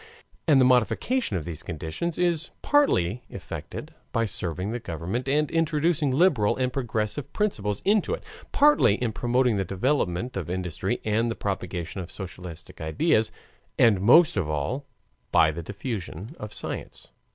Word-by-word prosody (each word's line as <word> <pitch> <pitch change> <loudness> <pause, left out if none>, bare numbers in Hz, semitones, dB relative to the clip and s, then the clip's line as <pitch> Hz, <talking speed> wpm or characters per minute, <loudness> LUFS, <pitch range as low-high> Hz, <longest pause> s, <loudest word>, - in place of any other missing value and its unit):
And 145 -4 +6
the 130 - +6
modification 130 - +2
of 80 - -5
these 80 -3 -5
conditions 80 - -4
is 175 -2 +1
partly 125 - +3
effected 90 - -7 0.2
by 115 -1 +1
serving 90 0 -3
the 120 - -3
government 95 - -4
and 150 +1 +2
introducing 160 -2 +1
liberal 130 - +3
and 130 -1 0
progressive 115 0 -2
principles 105 - -1
into 210 - +3
it, - - -14 0.3
partly 285 - +5
in 115 -1 -2
promoting 120 -1 +2
the 95 - +1
development 100 - -1
of 90 -4 -4
industry 90 0 -2
and 110 +2 +1
the 115 - -2
propagation 90 -2 -3
of 90 - -8
socialistic 90 -4 -9
ideas, 110 - +2 0.5
and 105 -5 +5
most 145 - +6
of 85 -5 0
all 120 - -2 0.4
by 80 -2 +5
the 85 +2 -5
diffusion 100 - -6
of 105 0 -6
science. - - -6
110 Hz, 150 wpm, -26 LUFS, 90-145 Hz, 0.5 s, And